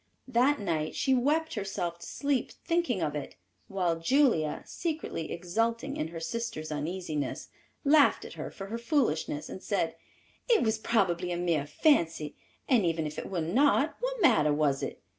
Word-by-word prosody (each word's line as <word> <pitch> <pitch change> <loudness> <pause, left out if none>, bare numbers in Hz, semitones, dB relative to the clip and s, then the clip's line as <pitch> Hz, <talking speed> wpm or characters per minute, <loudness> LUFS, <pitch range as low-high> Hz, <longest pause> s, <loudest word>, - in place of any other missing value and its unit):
That 260 +3 +3
night 160 -6 -2
she 265 - +2
wept 300 +6 +1
herself 195 -5 -3
to - - -9
sleep 280 -3 -1
thinking 335 - +1
of 150 -2 -1
it, 145 - -5 0.3
while 180 -4 0
Julia, 170 - +2
secretly 310 - -4
exulting 230 +10 -1
in 155 - -2
her 165 0 -7
sister's 165 -4 -4
uneasiness, 150 -2 -3 0.3
laughed 295 0 +5
at - - -9
her - - -6
for 195 - -8
her 225 +4 -5
foolishness, 230 - 0
and 190 - -8
said, 195 -6 -1 0.5
"It 465 - +5
was 220 -1 +1
probably 180 -6 +1
a 175 - -1
mere 165 -5 0
fancy, 165 - +2 0.3
and 245 -6 +4
even 165 -2 0
if 150 - -4
it - - -6
were 180 -3 -1
not; 275 - +3
what - - -2
matter 180 - +5
was 145 -2 +1
it? - - -5
195 Hz, 165 wpm, -29 LUFS, 160-265 Hz, 0.5 s, laughed